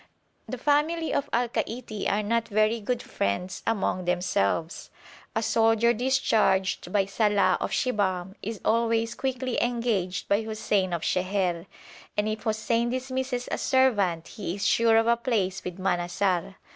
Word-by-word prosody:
The 255 Hz, -, -4 dB
family 300 Hz, +5 st, +1 dB
of 285 Hz, 0 st, -1 dB
Al 240 Hz, +1 st, +1 dB
Kaiti 225 Hz, -2 st, -3 dB
are 210 Hz, +1 st, 0 dB
not 230 Hz, +2 st, 0 dB
very 215 Hz, +2 st, +2 dB
good 245 Hz, +3 st, -2 dB
friends 175 Hz, -, -2 dB
among 195 Hz, -4 st, 0 dB
themselves; 175 Hz, -, -1 dB, 0.5 s
a 225 Hz, -, 0 dB
soldier 225 Hz, +1 st, +3 dB
discharged 220 Hz, -7 st, +1 dB
by 200 Hz, -1 st, +2 dB
Salàh 200 Hz, -2 st, +2 dB
of -, -, -1 dB
Shibahm 190 Hz, -6 st, 0 dB
is 220 Hz, 0 st, -5 dB
always 230 Hz, 0 st, +1 dB
quickly 260 Hz, -2 st, -2 dB
engaged 230 Hz, -6 st, -1 dB
by 200 Hz, +2 st, +2 dB
Hussein 215 Hz, -4 st, -1 dB
of 170 Hz, -2 st, -2 dB
Sheher, 185 Hz, -2 st, 0 dB, 0.5 s
and 210 Hz, +1 st, +1 dB
if 215 Hz, 0 st, -3 dB
Hussein 230 Hz, +1 st, 0 dB
dismisses 255 Hz, 0 st, -3 dB
a -, -, -1 dB
servant 205 Hz, -11 st, +2 dB
he 190 Hz, -4 st, -5 dB
is 200 Hz, 0 st, -3 dB
sure 230 Hz, +1 st, +4 dB
of 225 Hz, -, +4 dB
a 235 Hz, 0 st, +4 dB
place 210 Hz, -6 st, -1 dB
with 180 Hz, 0 st, -6 dB
Manassar. 180 Hz, 0 st, 0 dB
215 Hz, 145 wpm, -26 LUFS, 185-235 Hz, 0.5 s, sure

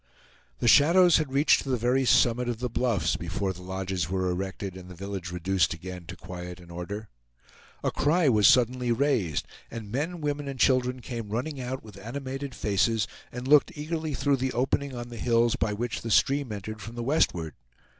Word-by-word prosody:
The -, -, -1 dB
shadows 175 Hz, +4 st, +6 dB
had 155 Hz, -4 st, -2 dB
reached 140 Hz, +3 st, +4 dB
to 135 Hz, -, -7 dB
the 130 Hz, -, +1 dB
very 125 Hz, +3 st, +1 dB
summit 120 Hz, 0 st, +3 dB
of 120 Hz, -, -2 dB
the 125 Hz, 0 st, -3 dB
bluffs 120 Hz, -4 st, +1 dB
before 95 Hz, -1 st, -2 dB
the 90 Hz, -, -12 dB
lodges 95 Hz, -1 st, -3 dB
were 95 Hz, -1 st, 0 dB
erected 95 Hz, +1 st, -4 dB
and 90 Hz, -1 st, -10 dB
the 90 Hz, -, -10 dB
village 95 Hz, -1 st, -5 dB
reduced 90 Hz, 0 st, +1 dB
again 90 Hz, +1 st, -8 dB
to -, -, -7 dB
quiet 90 Hz, 0 st, -8 dB
and 85 Hz, -1 st, -14 dB
order. 100 Hz, +5 st, -6 dB, 0.8 s
A -, -, +1 dB
cry 165 Hz, +2 st, +2 dB
was 105 Hz, -5 st, +5 dB
suddenly 125 Hz, 0 st, +3 dB
raised, 115 Hz, -, +1 dB, 0.2 s
and 110 Hz, -3 st, -7 dB
men, 160 Hz, +8 st, -2 dB
women, 145 Hz, -1 st, -2 dB
and 135 Hz, -2 st, -6 dB
children 125 Hz, 0 st, +2 dB
came 115 Hz, -4 st, -6 dB
running 130 Hz, +6 st, -3 dB
out 130 Hz, +1 st, -4 dB
with 105 Hz, -3 st, -12 dB
animated 135 Hz, +2 st, -5 dB
faces, 105 Hz, +2 st, +1 dB, 0.2 s
and 125 Hz, +1 st, -6 dB
looked 150 Hz, +3 st, +4 dB
eagerly 155 Hz, 0 st, -3 dB
through 140 Hz, 0 st, +2 dB
the 130 Hz, 0 st, -2 dB
opening 135 Hz, +2 st, 0 dB
on 120 Hz, 0 st, -6 dB
the 120 Hz, -, -8 dB
hills 115 Hz, 0 st, +2 dB
by 110 Hz, -, 0 dB
which 115 Hz, +2 st, -3 dB
the 115 Hz, -, -5 dB
stream 135 Hz, +2 st, +2 dB
entered 105 Hz, +1 st, -6 dB
from 115 Hz, +3 st, -8 dB
the 120 Hz, -, -4 dB
westward. 90 Hz, -, +1 dB
120 Hz, 195 wpm, -27 LUFS, 95-135 Hz, 0.8 s, shadows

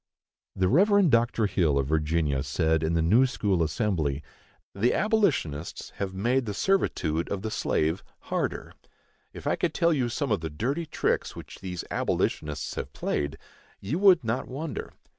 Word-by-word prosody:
The 95 Hz, -1 st, +2 dB
Rev. 195 Hz, -, +4 dB
Dr. 115 Hz, -1 st, +3 dB
Hill, 85 Hz, -8 st, +2 dB
of 70 Hz, -, +1 dB
Virginia, 75 Hz, -1 st, +1 dB
said, 80 Hz, +3 st, +1 dB
in 80 Hz, +1 st, 0 dB
the 80 Hz, -, +2 dB
New 115 Hz, +11 st, +5 dB
School 100 Hz, -8 st, 0 dB
Assembly: 80 Hz, -, 0 dB, 0.5 s
The 115 Hz, +5 st, +1 dB
abolitionists 185 Hz, -, 0 dB
have 100 Hz, -1 st, -2 dB
made 120 Hz, +5 st, +1 dB
the 105 Hz, -, -3 dB
servitude 85 Hz, -, 0 dB
of 100 Hz, 0 st, -3 dB
the 110 Hz, -, -3 dB
slave 80 Hz, +1 st, 0 dB, 0.2 s
harder. -, -, -3 dB, 0.6 s
If -, -, -10 dB
I -, -, +2 dB
could 170 Hz, -3 st, -1 dB
tell 170 Hz, -1 st, +3 dB
you 130 Hz, -5 st, 0 dB
some 135 Hz, +2 st, -2 dB
of 105 Hz, -, +1 dB
the 80 Hz, -, -3 dB
dirty 135 Hz, -, -2 dB
tricks 155 Hz, -, -1 dB
which -, -, -10 dB
these 90 Hz, -3 st, -5 dB
abolitionists 75 Hz, -2 st, -1 dB
have -, -, -5 dB
played, 70 Hz, -1 st, -2 dB, 0.4 s
you 135 Hz, -, -2 dB
would 190 Hz, -6 st, +6 dB
not 115 Hz, +3 st, -2 dB
wonder. 145 Hz, +4 st, -5 dB
100 Hz, 160 wpm, -27 LUFS, 80-135 Hz, 0.6 s, would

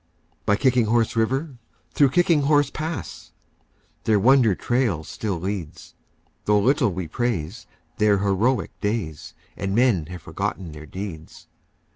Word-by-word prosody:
By 105 Hz, -, +4 dB
Kicking 125 Hz, 0 st, +3 dB
Horse 115 Hz, +1 st, +1 dB
River, 130 Hz, +4 st, -1 dB, 0.3 s
through 140 Hz, -2 st, +4 dB
Kicking 170 Hz, 0 st, +3 dB
Horse 145 Hz, -1 st, +3 dB
Pass, 160 Hz, 0 st, -6 dB, 0.7 s
Their 110 Hz, -1 st, +4 dB
wonder 120 Hz, -2 st, +5 dB
trail 120 Hz, -10 st, 0 dB
still 95 Hz, +2 st, -4 dB
leads, 95 Hz, -3 st, -5 dB, 0.5 s
Though 105 Hz, 0 st, +4 dB
little 125 Hz, +1 st, +2 dB
we 90 Hz, -1 st, -4 dB
praise 105 Hz, -1 st, -3 dB, 0.3 s
their 105 Hz, -1 st, +4 dB
heroic 100 Hz, +2 st, +1 dB
days 105 Hz, -8 st, -3 dB, 0.2 s
And 95 Hz, 0 st, -3 dB
men 115 Hz, -10 st, +3 dB
have 90 Hz, -1 st, -9 dB
forgotten 90 Hz, -4 st, -4 dB
their 75 Hz, 0 st, -10 dB
deeds. 90 Hz, -3 st, -8 dB
105 Hz, 130 wpm, -23 LUFS, 95-125 Hz, 0.7 s, wonder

